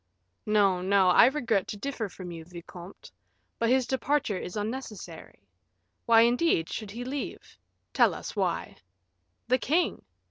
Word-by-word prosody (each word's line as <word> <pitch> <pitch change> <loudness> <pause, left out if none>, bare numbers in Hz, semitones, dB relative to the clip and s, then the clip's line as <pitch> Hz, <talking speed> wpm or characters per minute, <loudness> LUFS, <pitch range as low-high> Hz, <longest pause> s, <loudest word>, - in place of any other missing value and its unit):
"No, 200 -4 +3
no; 190 0 +3
I - - +7
regret 235 -8 0
to 210 - -6
differ 230 -2 -4
from 180 -1 -9
you, 165 -1 -8
vicomte; 175 +2 -12 0.5
but 230 - +1
his 260 0 +3
departure 265 -5 0
is 180 - -6
unnecessary. 210 - -7 0.6
Why, 225 -1 +7
indeed, 240 - +2
should 215 -3 -5
he 235 +4 -6
leave? 275 +2 -6 0.4
tell - - +4
us - - -7
why." - - -2 0.7
"The 255 +2 +2
king!" 330 +8 0
215 Hz, 140 wpm, -28 LUFS, 185-255 Hz, 0.7 s, I